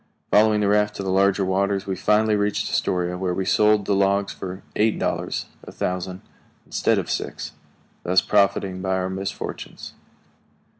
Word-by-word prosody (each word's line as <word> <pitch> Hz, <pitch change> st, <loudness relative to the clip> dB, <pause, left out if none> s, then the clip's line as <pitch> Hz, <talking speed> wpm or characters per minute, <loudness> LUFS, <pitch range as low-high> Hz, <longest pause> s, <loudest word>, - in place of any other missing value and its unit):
Following 105 Hz, 0 st, +4 dB
the 105 Hz, -, +2 dB
raft 105 Hz, +1 st, +2 dB
to 100 Hz, -, -4 dB
the 95 Hz, -, -1 dB
larger 100 Hz, 0 st, +3 dB
waters, 100 Hz, +1 st, 0 dB
we 95 Hz, -, -2 dB
finally 105 Hz, +3 st, +2 dB
reached 105 Hz, 0 st, 0 dB
Astoria, 90 Hz, 0 st, 0 dB
where 90 Hz, -1 st, -1 dB
we 95 Hz, -, -2 dB
sold 105 Hz, 0 st, +3 dB
the 100 Hz, -, +1 dB
logs 100 Hz, 0 st, +1 dB
for 95 Hz, 0 st, -7 dB
eight 110 Hz, +1 st, +2 dB
dollars -, -, -2 dB, 0.2 s
a -, -, -10 dB
thousand 90 Hz, +1 st, -3 dB, 0.4 s
instead -, -, +1 dB
of -, -, -2 dB
six, -, -, -4 dB, 0.5 s
thus 90 Hz, +1 st, +3 dB
profiting 100 Hz, -2 st, +1 dB
by 95 Hz, 0 st, 0 dB
our 95 Hz, 0 st, -2 dB
misfortunes. 95 Hz, +1 st, -6 dB
100 Hz, 160 wpm, -23 LUFS, 95-105 Hz, 0.5 s, Following